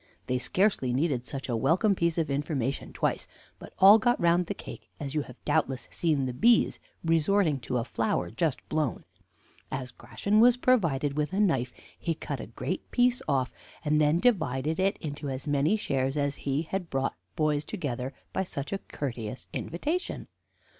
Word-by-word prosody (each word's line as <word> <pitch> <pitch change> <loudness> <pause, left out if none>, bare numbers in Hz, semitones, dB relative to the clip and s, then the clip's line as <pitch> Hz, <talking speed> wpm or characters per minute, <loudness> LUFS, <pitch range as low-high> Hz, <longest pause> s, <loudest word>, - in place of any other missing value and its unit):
They 125 0 0
scarcely 185 - +1
needed 135 -3 0
such 135 -1 -5
a 120 - -1
welcome 185 - +3
piece 170 -3 0
of 160 -4 0
information 140 -2 -2
twice, - - -1 0.3
but - - -11
all 200 +4 +9
got 240 +2 +2
round 170 +1 +3
the - - -3
cake, - - -10
as 140 -3 -4
you 155 - +1
have 125 -3 -10
doubtless 140 -5 0
seen 150 -5 +1
the 125 - -3
bees 230 - +4 0.3
resorting 165 -1 +3
to 125 +1 -2
a 120 - 0
flower 110 -7 -1
just 150 +3 -1
blown. 155 -5 -1 0.7
As 125 -2 -4
Gratian 210 +10 0
was 240 +2 +6
provided 165 - +2
with 150 +4 -1
a 195 - 0
knife, 135 - +2 0.3
he 165 -2 -1
cut - - -5
a - - -6
great - - -4
piece 250 0 +2
off, 135 -3 +1 0.3
and 150 0 +3
then 150 +3 +3
divided 160 - +1
it 195 +2 +2
into 145 -1 -5
as 130 +1 -4
many 145 +7 +2
shares 135 -6 -1
as 145 -1 0
he 140 +3 -1
had 180 +1 -4
brought 135 0 0 0.2
boys 150 -1 +1
together 135 - -4 0.2
by - - 0
such 145 -3 -5
a 195 - -1
courteous 125 - -5
invitation. 305 - -3
150 Hz, 175 wpm, -28 LUFS, 135-180 Hz, 0.7 s, all